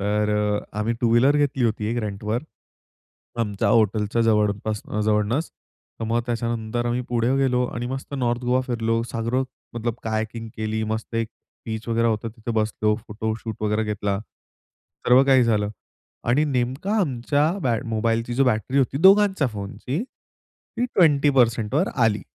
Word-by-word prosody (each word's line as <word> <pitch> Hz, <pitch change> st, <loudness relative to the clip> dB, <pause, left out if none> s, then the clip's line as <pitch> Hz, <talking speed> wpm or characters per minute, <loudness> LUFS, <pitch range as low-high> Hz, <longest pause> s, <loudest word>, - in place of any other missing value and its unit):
तर 105 Hz, +1 st, +1 dB
अ, 105 Hz, 0 st, 0 dB, 0.2 s
आम्ही 110 Hz, +2 st, 0 dB
two 120 Hz, -, +2 dB
wheeler 130 Hz, +5 st, +5 dB
घेतली 140 Hz, -3 st, +1 dB
होती 110 Hz, -2 st, 0 dB
एक 120 Hz, -, -2 dB
रेंटवर. 105 Hz, +4 st, -3 dB, 1.0 s
आमच्या 105 Hz, -3 st, 0 dB
हॉटेलच्या 110 Hz, +1 st, +2 dB
जवळपास 105 Hz, -1 st, +1 dB
अ, 105 Hz, -, -2 dB
जवळूनच. 105 Hz, +8 st, +1 dB, 0.5 s
तर 115 Hz, -, -1 dB
मग 115 Hz, +2 st, +1 dB
त्याच्यानंतर 120 Hz, 0 st, -2 dB
आम्ही 120 Hz, +1 st, 0 dB
पुढे 120 Hz, +2 st, +1 dB
गेलो 125 Hz, -2 st, +2 dB
आणि 120 Hz, +1 st, -3 dB
मस्त 135 Hz, +2 st, -5 dB
नॉर्थ 120 Hz, -3 st, 0 dB
गोवा 125 Hz, +1 st, +2 dB
फिरलो. 115 Hz, -2 st, 0 dB
सागरो 120 Hz, +3 st, 0 dB, 0.3 s
मतलब 120 Hz, 0 st, -2 dB
हायकिंग 110 Hz, +1 st, -3 dB
केली. 110 Hz, 0 st, -2 dB
मस्त 110 Hz, +1 st, -4 dB
एक 115 Hz, -1 st, 0 dB, 0.4 s
बीच 110 Hz, +1 st, -5 dB
वगैरे 115 Hz, 0 st, +2 dB
होतं 110 Hz, 0 st, -1 dB
तिथे 110 Hz, +1 st, -6 dB
बसलो. 105 Hz, 0 st, 0 dB
फोटोशूट 110 Hz, +1 st, -4 dB
वगैरे 105 Hz, +1 st, +1 dB
घेतला. 105 Hz, -2 st, -1 dB, 0.9 s
सर्व 125 Hz, +2 st, +7 dB
काही 135 Hz, -2 st, +5 dB
झालं. 105 Hz, -3 st, +1 dB, 0.6 s
आणि 135 Hz, +6 st, +3 dB
नेमका 130 Hz, +6 st, -1 dB
आमच्या 145 Hz, -3 st, 0 dB, 0.2 s
बॅट 115 Hz, -3 st, 0 dB
मोबाईलची 115 Hz, +1 st, 0 dB
जो 135 Hz, +2 st, +3 dB
बॅटरी 125 Hz, +2 st, +1 dB
होती 135 Hz, 0 st, +1 dB
दोघांच्या 195 Hz, -5 st, +6 dB
फोनची 110 Hz, -, -4 dB
ती 245 Hz, -2 st, -9 dB
20%वर 140 Hz, -, +3 dB
आली. 110 Hz, -5 st, +2 dB
115 Hz, 150 wpm, -23 LUFS, 110-125 Hz, 1.0 s, सर्व